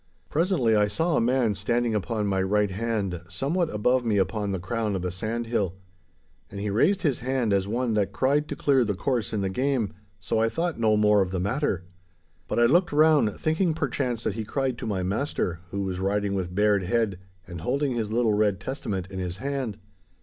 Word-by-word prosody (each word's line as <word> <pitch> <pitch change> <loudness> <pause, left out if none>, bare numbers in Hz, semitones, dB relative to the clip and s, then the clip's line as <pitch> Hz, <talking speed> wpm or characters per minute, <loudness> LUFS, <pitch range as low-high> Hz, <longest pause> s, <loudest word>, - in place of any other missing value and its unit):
Presently 155 - +2
I 105 -1 +4
saw 160 +11 0
a - - +3
man 120 -2 +2
standing 120 +2 0
upon 105 +1 -1
my 95 -1 +1
right 100 +1 +1
hand 100 -4 -2
somewhat 165 - -1
above 125 +4 +1
me 110 -3 +1
upon 100 +1 0
the 95 - -1
crown 105 +3 -2
of 90 -1 -3
a 90 - -1
sandhill. 110 -1 -2 0.7
And 100 - -7
he 105 0 -2
raised 180 - +2
his 145 -7 +1
hand 125 -4 0
as 100 -1 +1
one 120 +2 0
that 100 -2 +1
cried 140 +8 +1
to - - -4
clear 135 -3 +3
the 105 -3 -1
course 120 +2 -1
in 105 - -1
the 95 - 0
game, 130 -1 0 0.3
so 110 - -1
I 115 0 +3
thought 165 +4 -2
no 110 -2 +3
more 105 -1 +4
of 95 - 0
the 95 0 -2
matter. 100 - -1 0.6
But - - -1
I 120 - +6
looked 175 +9 +3
round, 150 -8 +4
thinking 160 +1 +1
perchance 130 -6 -2
that - - -1
he 110 +1 -4
cried 130 +2 -2
to - - -4
my 95 -3 -1
master, 95 - -1
who 100 +1 -3
was 95 -1 -3
riding 100 +1 0
with 90 -2 -3
bared 105 0 +3
head 110 -2 0 0.3
and 85 -3 -8
holding 140 - 0
his 115 -3 -2
little 115 -1 +2
red 105 -3 +2
Testament 95 -5 -4
in 95 - -5
his 90 -1 -4
hand. 135 -4 -3
110 Hz, 210 wpm, -26 LUFS, 100-130 Hz, 0.7 s, I